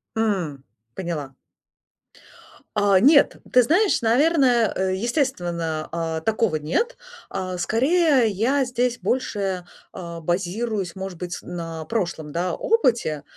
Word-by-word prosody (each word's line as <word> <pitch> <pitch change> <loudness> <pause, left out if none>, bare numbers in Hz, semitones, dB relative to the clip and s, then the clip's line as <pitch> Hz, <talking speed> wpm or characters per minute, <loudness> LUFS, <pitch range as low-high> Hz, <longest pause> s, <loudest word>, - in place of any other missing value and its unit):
М, 185 -11 -1 0.3
поняла. 155 -7 -5 1.4
А, 205 -2 +4
нет, 280 +6 +5 0.2
ты 250 - +6
знаешь, 360 - +2
наверное, 250 -2 +3
э, 190 0 0
естественно, 175 - -1
а, 165 -1 -2
такого 220 -1 +1
нет. 160 - -1 0.3
А, 185 -1 -4
скорее, 270 - +3
я 245 +8 +1
здесь 245 0 -1
больше, 195 -9 -2 0.3
а, 170 -2 -7
базируюсь, 190 +3 -2
может 190 -3 -6
быть, 175 -1 -4
на 165 -2 -6
прошлом, 170 -7 -3
да, 175 +2 -1
опыте, 235 - +1
195 Hz, 110 wpm, -23 LUFS, 170-245 Hz, 1.4 s, ты